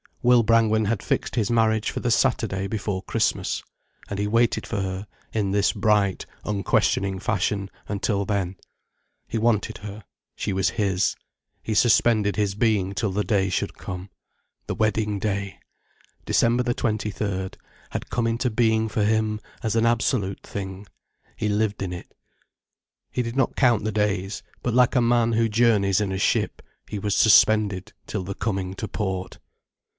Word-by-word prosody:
Will 125 -1 +6
Brangwen 110 -1 +3
had 105 0 0
fixed - - -1
his 110 -4 +1
marriage 110 -2 +2
for - - -4
the 120 - 0
Saturday 105 -6 +1
before 100 -2 -3
Christmas. - - -1 0.4
And 100 - -4
he 105 - 0
waited 115 +2 +2
for 105 -4 -2
her, 95 +1 -4 0.2
in 105 -3 0
his 100 0 +2
bright, 105 -2 +1 0.2
unquestioning 100 -1 +1
fashion, 100 +1 -1 0.2
until 100 0 -1
then. 95 -2 -1 0.7
He - - -3
wanted 110 -2 +1
her, 105 +1 -8 0.3
she 100 - -2
was 95 -1 +1
his, 95 -2 +1 0.5
he 110 - -3
suspended 110 -2 +3
his 105 -2 0
being 105 -4 +1
till 105 0 -1
the 105 +2 0
day 100 -4 +1
should 90 - -2
come. 90 +1 -7 0.6
The - - -2
wedding 110 -1 0
day, 100 -1 -3 0.7
December 120 +1 +3
the 120 0 0
twenty 110 -2 -1
third, 95 -2 -3 0.3
had - - -5
come 120 -1 0
into 115 +2 0
being 110 -1 +2
for 105 0 0
him 110 0 +1 0.2
as 110 -1 -1
an 115 0 +3
absolute 115 -4 0
thing. 95 0 -7 0.5
He 110 - -2
lived 105 0 0
in 95 -2 -3
it. 90 - -9 1.0
He 125 - -1
did 115 0 -4
not 135 - +1
count 120 -5 +3
the 110 - -1
days. 100 -1 -1 0.2
But 120 - 0
like 125 +1 +4
a 125 - +5
man 120 -1 +3
who 115 0 +2
journeys 105 -4 +3
in 100 -2 -1
a 95 - -2
ship, - - 0 0.2
he 105 - -5
was 105 +1 0
suspended 105 -3 +4
till 100 -3 -3
the 100 +2 -5
coming 95 -3 -2
to 110 - -4
port. 95 -4 -3
105 Hz, 165 wpm, -24 LUFS, 100-115 Hz, 1.0 s, Will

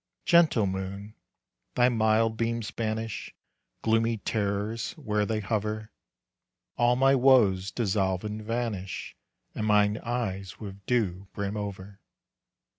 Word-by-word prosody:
Gentle 165 -11 +5
moon, 95 +2 -4 0.6
thy 125 0 +5
mild 110 -1 +2
beams 115 -2 -2
banish 110 -1 -4 0.5
Gloomy 115 0 +2
terrors 105 +1 -2
where 105 -9 -1
they 110 -1 -1
hover. 110 +1 -2 0.8
All 120 0 +3
my 135 +2 +4
woes 120 -8 +4
dissolve 95 -5 0
and 105 0 -4
vanish, 110 -4 -3 0.4
And 110 - -2
mine 105 0 +3
eyes 100 -6 -3
with 100 -2 -8
dew 100 -6 0
brim 100 0 -3
over. 100 -1 -6
110 Hz, 115 wpm, -28 LUFS, 100-115 Hz, 0.8 s, Gentle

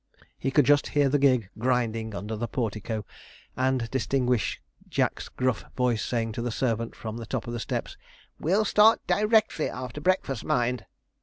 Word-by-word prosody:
He 135 - 0
could 145 0 +4
just 145 +2 +4
hear 145 -1 +5
the 145 +2 +2
gig 125 -8 +3
grinding 115 -3 0
under 105 +2 -4
the 120 +2 -3
portico, 110 -2 -3 0.5
and 130 -2 +1
distinguish 125 -2 0 0.3
Jack's - - -1
gruff 130 -2 -1
voice 125 -3 +1
saying 115 -2 -1
to 115 - -4
the 120 - -1
servant 115 -1 -1
from 110 0 -6
the 115 -2 -7
top - - -3
of 120 - -5
the 120 - -3
steps, - - -4 0.4
'We'll 195 +7 +2
start 215 +2 +5
directly 215 -5 +2
after 130 +3 -6
breakfast, 155 - 0
mind.' 120 -1 0
125 Hz, 165 wpm, -27 LUFS, 115-135 Hz, 0.5 s, hear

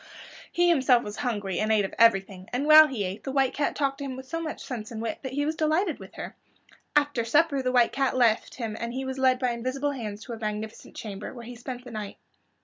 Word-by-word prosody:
He 350 0 +3
himself 265 -7 +4
was 210 0 -7
hungry 205 -8 -2
and 215 +1 +1
ate 210 -2 +3
of - - -6
everything, 195 -4 +3
and 255 +4 -1
while 310 0 +9
he 250 -8 -3
ate 190 +2 -5
the 270 - -4
White 270 -1 +2
Cat 290 - -1
talked 275 -1 -1
to - - -4
him 265 -2 -4
with 260 +1 -8
so 330 +4 -3
much 315 -2 -5
sense 225 -4 -6
and 225 - -6
wit 225 0 -3
that 265 -1 -6
he 290 +1 0
was 310 +1 -1
delighted 320 +2 +1
with - - -12
her. - - -7 0.6
After 290 -5 +2
supper 290 +4 +3
the 255 -1 0
White 245 -2 +4
Cat 270 -1 0
left 235 -3 +2
him 225 -4 -4
and 235 0 -4
he 265 +1 -3
was 265 0 -4
led 260 -1 +4
by 250 -1 0
invisible 255 +4 -2
hands 215 -5 -6
to 240 - -7
a 225 - -7
magnificent 215 0 -5
chamber, 210 +1 -7
where 235 -1 -9
he 245 +1 -8
spent 245 +1 -7
the 245 - -9
night. 210 -2 -6
250 Hz, 250 wpm, -27 LUFS, 220-275 Hz, 0.6 s, while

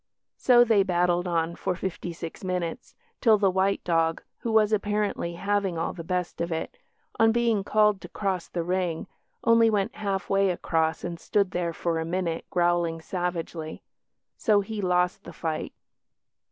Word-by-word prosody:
So 240 -2 +6
they 220 -4 +4
battled 175 -1 +1
on 170 -1 0
for 180 - -2
fifty 180 -1 -4
six 165 +1 -8
minutes, 180 -3 -3 0.3
till 225 -4 +6
the 200 -2 +3
white 190 +1 +1
dog 165 -1 +1 0.2
(who 230 - -3
was 220 -1 +4
apparently 205 -4 -1
having 195 -1 0
all 165 - -2
the 170 - -7
best 180 0 -2
of 170 0 -2
it), 160 - -4 0.4
on 225 0 +6
being 230 -3 +2
called 210 -1 +3
to - - -9
cross 190 -4 -2
the 170 - -3
ring, 180 -2 -1 0.4
only 230 0 +5
went 205 -3 0
half 195 -2 -2
way 195 0 +3
across 160 -2 0
and 170 -1 -4
stood 195 +3 +1
there 175 -2 -1
for 165 0 -1
a - - -1
minute 170 -1 -2
growling 175 -2 +1
savagely. 170 -2 -4 0.5
So 210 -3 +3
he 210 +1 -5
lost 180 -1 +1
the 170 - -10
fight. 160 -1 -3
180 Hz, 165 wpm, -26 LUFS, 170-205 Hz, 0.5 s, So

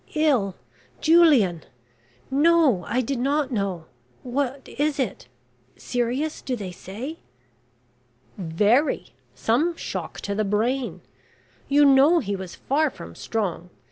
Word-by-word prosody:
"Ill 260 - +2 0.4
Julian! 295 - +5 0.7
No; 290 - +4
I 250 - 0
did 255 +1 -3
not 280 +2 0
know. 195 -7 -2 0.4
What 270 +1 -3
is 300 0 +1
it? 190 - -3 0.5
serious 250 +6 -2
do 255 - -2
they 200 -5 -6
say?" 225 - -7 1.2
"Very. 210 - +1 0.2
Some 250 - +1
shock - - -5
to 200 - -3
the 215 +1 0
brain. 230 +6 -1 0.7
You 290 +1 +5
know 280 +5 +6
he 205 -10 -1
was 190 -2 -7
far 300 +3 +1
from 85 - -11
strong. 180 - -3
250 Hz, 115 wpm, -24 LUFS, 200-290 Hz, 1.2 s, know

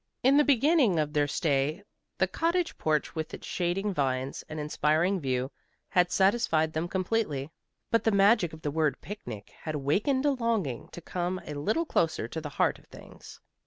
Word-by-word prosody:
In 265 +3 +5
the 295 - +6
beginning 280 - +4
of 150 -1 0
their 145 -2 +2
stay 145 +4 0 0.3
the 190 - +3
cottage 335 - 0
porch 155 -1 0
with 160 -1 -4
its - - -11
shading 190 +3 -1
vines 135 -3 -1
and 155 - -5
inspiring 155 +5 +1
view, 130 -2 -1 0.4
had 180 -2 +3
satisfied 190 -6 +2
them 160 +2 -1
completely, 180 -7 -1 0.4
but 230 - +3
the - - +3
magic 200 -3 +4
of 160 0 -12
the 145 - -1
word 155 -1 0
"picnic" 180 - -8
had 155 -1 -4
awakened 205 - +1
a 290 - +4
longing 225 - -1
to 175 - -8
come 180 +2 -3
a 150 - -6
little 215 - 0
closer 160 - 0
to 160 +6 -5
the 150 - -5
heart - - 0
of - - -24
things. - - -13
175 Hz, 180 wpm, -28 LUFS, 150-215 Hz, 0.4 s, the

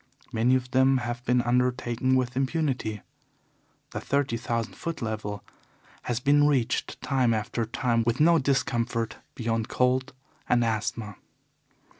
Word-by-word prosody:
Many 120 +3 +3
of 125 -1 -2
them 130 +1 +4
have 120 0 -4
been 125 0 +2
undertaken 125 0 +1
with 125 -1 0
impunity. 130 - -1 0.9
The - - -4
thirty 140 -4 0
thousand 115 0 -2
foot 165 -1 -5
level 105 -3 -4 0.6
has 120 -1 -1
been 145 +3 +4
reached 130 -6 0
time 130 -4 +2
after 115 +1 -2
time 115 0 +1
with 120 +1 0
no 165 +2 +5
discomfort 120 -4 0 0.2
beyond 115 -1 -1
cold 130 +2 +1 0.4
and 120 -1 +3
asthma. 110 -2 -2
125 Hz, 130 wpm, -27 LUFS, 115-130 Hz, 0.9 s, no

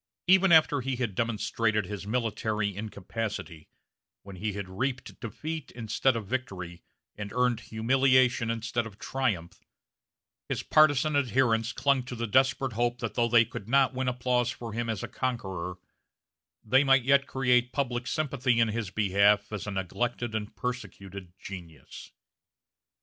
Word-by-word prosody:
Even 190 +1 +5
after 155 -3 +5
he 130 +1 -2
had 120 -5 -2
demonstrated 110 -1 0
his 100 +1 -6
military 110 -3 -1
incapacity, 100 -5 -5 0.6
when 95 -1 -10
he 105 +2 -2
had 100 -1 -5
reaped 125 +7 -4
defeat 150 +6 -5
instead 120 +2 +1
of 115 -2 -3
victory, 95 -8 -4 0.3
and 100 -1 -6
earned 125 -2 +2
humiliation 130 +1 +2
instead 115 0 -2
of 105 -2 -13
triumph, 110 -11 -2 0.9
his - - -2
partizan 155 -1 +4
adherents 120 -3 +2
clung 140 0 +2
to 125 0 -7
the 115 0 -2
desperate 130 +2 +2
hope 120 +2 0
that 115 -3 -4
though 120 -1 +2
they 115 0 +6
could 110 -2 -8
not 135 0 +4
win 130 0 -2
applause 125 -1 +1
for 115 -3 -6
him 115 +1 -2
as 110 -4 -3
a - - -3
conqueror, 95 -8 -3 0.9
they 130 +5 +4
might 135 -2 +4
yet 140 +2 +3
create 125 -2 +2
public 125 -3 -2
sympathy 135 -6 0
in 115 -1 +3
his 110 -2 -3
behalf 100 +1 +2
as 105 -1 -4
a - - -2
neglected 120 +5 -2
and 110 0 -4
persecuted 100 -5 -6
genius. 85 -6 -10
115 Hz, 150 wpm, -28 LUFS, 105-130 Hz, 0.9 s, they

